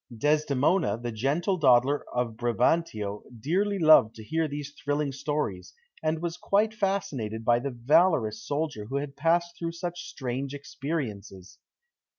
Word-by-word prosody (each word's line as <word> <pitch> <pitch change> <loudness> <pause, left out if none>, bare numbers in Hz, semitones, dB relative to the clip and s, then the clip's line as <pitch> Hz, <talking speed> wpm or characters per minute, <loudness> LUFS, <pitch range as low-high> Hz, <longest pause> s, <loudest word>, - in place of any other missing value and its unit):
Desdemona, 150 - +2
the 120 0 -5
gentle 145 - 0
daughter 135 -1 +4
of 120 -2 -1
Brabantio, 120 -3 0 0.2
dearly 195 - 0
loved 155 - +6
to 110 - -10
hear 160 +7 0
these 145 0 -6
thrilling 145 -1 -2
stories, 135 -9 -3 0.3
and 160 +1 -1
was 170 0 -3
quite 210 +4 +1
fascinated 185 - -2
by 120 +1 +4
the 140 +3 -3
valorous 120 -3 +2
soldier 145 -7 -3
who 135 - -6
had 140 0 -4
passed 170 +3 +1
through 165 -1 -3
such 175 +1 -5
strange 130 +1 -4
experiences. 130 - -6
145 Hz, 140 wpm, -27 LUFS, 120-165 Hz, 0.3 s, loved